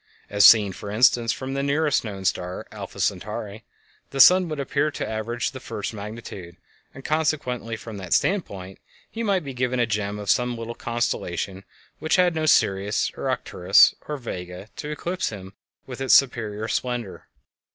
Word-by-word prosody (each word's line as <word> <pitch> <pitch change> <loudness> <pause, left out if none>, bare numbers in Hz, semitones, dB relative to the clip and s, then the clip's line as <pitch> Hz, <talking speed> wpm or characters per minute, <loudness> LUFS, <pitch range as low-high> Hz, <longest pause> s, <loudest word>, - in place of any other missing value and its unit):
As 100 0 +7
seen, 105 -4 +6
for 100 - -8
instance, 115 +1 +3
from 130 +3 -5
the 140 - -1
nearest 145 +1 +1
known 100 -4 -6
star, 90 0 -2
Alpha - - -9
Centauri, - - -3 0.5
the 140 - -6
sun 180 +6 +7
would 155 -2 -4
appear 140 +2 0
of 150 - -5
the - - -3
average 115 +2 -3
first 130 -5 -6
magnitude, 100 -5 -8 0.3
and 135 - -13
consequently 145 -7 -1
from 110 -1 -9
that 90 -3 0
standpoint 100 - -2 0.3
he 230 - -5
might 200 -5 +1
be 135 - -5
the 125 -1 0
gem 105 -2 -2
of 105 -1 -7
some 125 -1 +1
little 115 0 -5
constellation 100 -5 -3 0.3
which 155 - +1
had 180 -1 +3
no 160 -1 -1
Sirius, 100 -5 +2
or - - -3
Arcturus, - - +4
or 150 - -3
Vega 90 -5 -7
to 150 - -5
eclipse 175 +5 -2
him 95 -3 -9 0.3
with 130 0 -8
its 135 - +5
superior 110 -5 +1
splendor. 120 -3 -3
120 Hz, 165 wpm, -24 LUFS, 105-140 Hz, 0.5 s, As